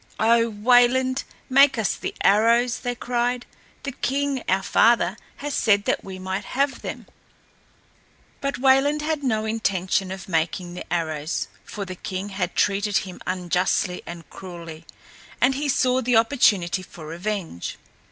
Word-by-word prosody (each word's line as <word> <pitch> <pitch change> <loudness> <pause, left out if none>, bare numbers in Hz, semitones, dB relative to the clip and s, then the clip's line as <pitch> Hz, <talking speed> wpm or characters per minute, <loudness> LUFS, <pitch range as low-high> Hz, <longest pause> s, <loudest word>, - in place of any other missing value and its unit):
"O 230 +1 +4
Wayland, 245 +4 +3 0.2
make 270 0 +5
us 220 -3 0
the - - -5
arrows," 230 +4 +4
they 245 0 -3
cried. 245 0 -1 0.4
"The 280 - -3
king, 275 0 -1
our 190 +1 +2
father, 205 -4 +3 0.2
has 290 0 -5
said 205 -3 +3
that - - 0
we 190 -1 -7
might 190 +2 -3
have 270 +5 -1
them." - - -6 1.3
But 275 0 -2
Wayland 270 +3 +3
had 310 -1 -1
no 220 -4 0
intention 195 -3 0
of 190 -1 -7
making 175 +1 -1
the 180 - -9
arrows, 160 -2 -2
for 200 -2 -6
the 185 - -6
king 185 +2 -5
had 185 -3 -3
treated 205 0 +2
him 185 -2 -10
unjustly 180 0 0
and 170 -1 -8
cruelly, 170 -3 -9 0.5
and 260 +2 +4
he 285 +2 -2
saw 255 -1 +2
the 245 -1 +1
opportunity 210 -7 +3
for 170 -3 -11
revenge. 170 - -4
210 Hz, 145 wpm, -24 LUFS, 185-250 Hz, 1.3 s, make